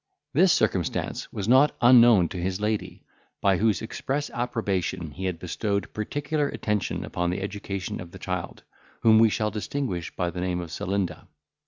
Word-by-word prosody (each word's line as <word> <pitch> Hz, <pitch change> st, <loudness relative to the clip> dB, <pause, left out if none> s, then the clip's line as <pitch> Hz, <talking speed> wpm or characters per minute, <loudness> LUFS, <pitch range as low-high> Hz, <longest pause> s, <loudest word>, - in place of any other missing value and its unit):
This 180 Hz, +5 st, +5 dB
circumstance 95 Hz, -7 st, 0 dB
was 100 Hz, -1 st, -4 dB
not 130 Hz, +5 st, +5 dB
unknown 120 Hz, -6 st, +7 dB
to 90 Hz, -, -5 dB
his 95 Hz, +1 st, -2 dB
lady, 105 Hz, 0 st, -2 dB, 0.4 s
by 95 Hz, -2 st, +3 dB
whose 110 Hz, +1 st, +1 dB
express 140 Hz, +5 st, -3 dB
approbation 95 Hz, -9 st, -2 dB
he 95 Hz, +5 st, -6 dB
had 90 Hz, -2 st, -1 dB
bestowed 100 Hz, +4 st, -2 dB
particular 145 Hz, +6 st, -1 dB
attention 105 Hz, -7 st, -2 dB
upon 85 Hz, 0 st, -2 dB
the 90 Hz, +2 st, -2 dB
education 100 Hz, -1 st, -4 dB
of 90 Hz, -, -9 dB
the 95 Hz, -, -11 dB
child, 90 Hz, -1 st, -5 dB, 0.4 s
whom 110 Hz, -1 st, +6 dB
we 115 Hz, 0 st, +6 dB
shall 105 Hz, 0 st, -1 dB
distinguish 105 Hz, -, -3 dB
by 90 Hz, -1 st, -1 dB
the 90 Hz, -, -5 dB
name 90 Hz, -1 st, -1 dB
of 85 Hz, -2 st, -6 dB
Celinda. 95 Hz, -1 st, -3 dB
100 Hz, 165 wpm, -26 LUFS, 90-115 Hz, 0.4 s, unknown